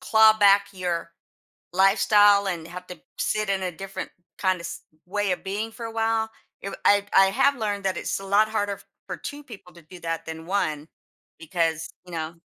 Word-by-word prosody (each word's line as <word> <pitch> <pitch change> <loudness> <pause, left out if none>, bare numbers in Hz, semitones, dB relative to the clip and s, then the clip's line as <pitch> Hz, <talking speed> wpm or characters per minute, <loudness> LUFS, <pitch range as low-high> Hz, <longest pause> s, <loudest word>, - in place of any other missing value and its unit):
claw 220 -4 +6
back 200 -1 +6
your 175 -3 -3 0.6
lifestyle 200 +2 +5
and 170 -4 -3
have 180 +1 -9
to 180 - -9 0.2
sit 215 -1 0
in 195 -1 0
a 180 -1 -2
different 195 +3 -7 0.3
kinda 185 -2 +1
s 170 +2 -7 0.2
way 205 +1 0
of 180 - -4
being 205 +4 -3
for 230 0 -8
a 225 - -7
while. 225 0 0 0.3
It 195 - -5
w - - -9
I 205 0 +5
I 195 0 +8
have 280 +8 +3
learned 205 -4 -2
that 190 -2 0
it's - - -2
a - - -9
lot 205 +2 +4
harder 205 -2 -2 0.3
for - - -5
2 290 +1 -7
people 215 -9 -13
to 170 - -15
do 175 +3 -13
that 165 -1 -3
than 160 0 -7
1 155 -5 -1 0.5
because, 165 -1 -1 0.2
you 180 - -13
know 160 0 -4
195 Hz, 195 wpm, -25 LUFS, 175-210 Hz, 0.6 s, I